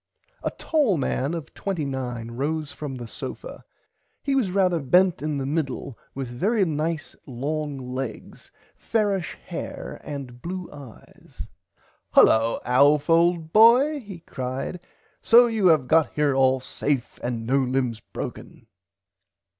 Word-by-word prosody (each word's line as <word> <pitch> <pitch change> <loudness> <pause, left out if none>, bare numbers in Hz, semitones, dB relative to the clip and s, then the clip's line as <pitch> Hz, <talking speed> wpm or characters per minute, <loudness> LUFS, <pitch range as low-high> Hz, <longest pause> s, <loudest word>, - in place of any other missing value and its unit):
A - - -1
tall 285 - +1
man 140 +2 -1
of 160 -2 -7
29 130 - -4
rose 150 +4 -2
from 145 -3 -6
the 120 -2 -7
sofa. - - -7 0.6
He 280 - 0
was 260 -8 +2
rarther 180 -3 +2
bent 180 -3 +4
in 150 -1 -2
the 135 - -3
middle 140 -3 -3 0.2
with 135 -1 -4
very 195 - +1
nice 160 0 -3
long 145 +3 -3
legs 130 -3 -6 0.3
fairish 205 -6 -1
hair - - -6
and 135 -4 -7
blue 180 +1 -5
eyes. 140 -6 -12 0.7
Hullo 115 +1 +5
Alf 145 +5 +4
old 165 -1 +3
boy 250 +7 +6
he 200 -8 -10
cried 130 +6 -5 0.4
so 240 +2 +7
you 220 -5 +2
have 155 -7 +4
got 160 +2 +3
here 150 -2 +2
all 130 0 +3
safe 135 0 -3
and 120 -2 -3
no 135 +4 +2
limbs 125 -3 0
broken. - - -8
150 Hz, 130 wpm, -24 LUFS, 130-180 Hz, 0.7 s, so